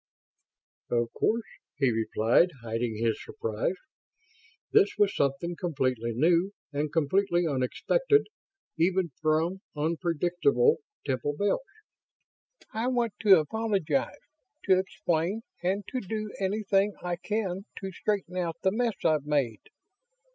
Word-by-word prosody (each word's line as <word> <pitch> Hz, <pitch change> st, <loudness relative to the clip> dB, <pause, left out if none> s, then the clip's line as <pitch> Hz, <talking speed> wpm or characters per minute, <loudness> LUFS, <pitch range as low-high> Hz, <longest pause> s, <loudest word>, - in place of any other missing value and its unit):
"Of 120 Hz, -1 st, 0 dB
course," 230 Hz, +1 st, +1 dB, 0.3 s
he 135 Hz, -4 st, +3 dB
replied, 115 Hz, +7 st, +3 dB
hiding 115 Hz, 0 st, -2 dB
his 115 Hz, 0 st, 0 dB
surprise. 110 Hz, -, -2 dB, 1.0 s
This 425 Hz, -2 st, +4 dB
was 205 Hz, -1 st, +3 dB
something 140 Hz, +5 st, 0 dB
completely 130 Hz, -9 st, -1 dB
new 170 Hz, -, +3 dB, 0.2 s
and 145 Hz, +1 st, -1 dB
completely 175 Hz, +3 st, +2 dB
unexpected, 295 Hz, -, +2 dB, 0.5 s
even 180 Hz, 0 st, +2 dB
from 160 Hz, +4 st, +1 dB, 0.2 s
unpredictable 175 Hz, -, +2 dB, 0.3 s
Temple 135 Hz, +2 st, -1 dB
Bells. 205 Hz, -, +1 dB, 1.1 s
"I 225 Hz, +3 st, -1 dB
want 240 Hz, -4 st, +1 dB
to 200 Hz, -3 st, +7 dB
apologize, 195 Hz, -, -1 dB, 0.5 s
to 190 Hz, -2 st, +4 dB
explain 185 Hz, +2 st, -1 dB, 0.2 s
and 190 Hz, +3 st, 0 dB
to 255 Hz, -, -2 dB
do 215 Hz, +1 st, -4 dB
anything 200 Hz, 0 st, +1 dB
I 175 Hz, -1 st, -2 dB
can 195 Hz, -1 st, -2 dB
to 195 Hz, -1 st, -5 dB
straighten 190 Hz, -1 st, -2 dB
out 170 Hz, -3 st, -1 dB
the 190 Hz, -, +3 dB
mess 230 Hz, 0 st, 0 dB
I've 155 Hz, -3 st, +2 dB
made. 135 Hz, -8 st, 0 dB
175 Hz, 115 wpm, -28 LUFS, 145-205 Hz, 1.1 s, to